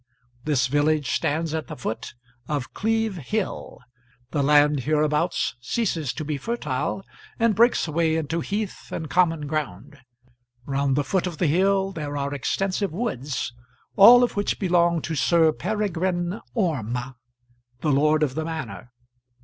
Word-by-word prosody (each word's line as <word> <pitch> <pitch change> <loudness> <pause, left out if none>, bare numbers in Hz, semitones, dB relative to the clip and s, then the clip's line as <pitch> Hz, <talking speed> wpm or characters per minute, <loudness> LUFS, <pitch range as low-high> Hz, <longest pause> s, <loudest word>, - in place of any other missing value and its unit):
This 145 -4 +2
village 145 +1 +1
stands 160 0 0
at 160 -1 -3
the - - -7
foot 115 0 -5 0.3
of 145 -4 -3
Cleeve 225 -2 0
Hill. 190 - -3 0.5
The 145 - 0
land 145 0 +4
hereabouts 150 +3 0
ceases 160 - -1
to 155 - -5
be 150 -1 -2
fertile, 195 - -2 0.3
and 230 -1 +3
breaks 235 -2 +3
away 160 +1 +1
into 160 +1 -1
heath 200 +4 -4
and 160 -3 -5
common 165 -2 +2
ground. 145 -3 -4 0.7
Round 140 -1 0
the 145 - +1
foot 185 +4 0
of 170 -3 -6
the 175 - +1
hill 190 +5 +2
there 145 -5 -5
are 140 0 -2
extensive 195 - -1
woods, 150 - -3 0.4
all 240 +5 +9
of 245 - 0
which 205 0 0
belong 170 -3 +2
to 165 - -3
Sir 160 +2 +4
Peregrine 185 0 -2
Orme, 130 - -1 0.7
the 155 - +1
lord 150 +2 +3
of 140 -4 0
the 160 - -2
manor. 155 -7 -6
160 Hz, 145 wpm, -24 LUFS, 145-190 Hz, 0.7 s, all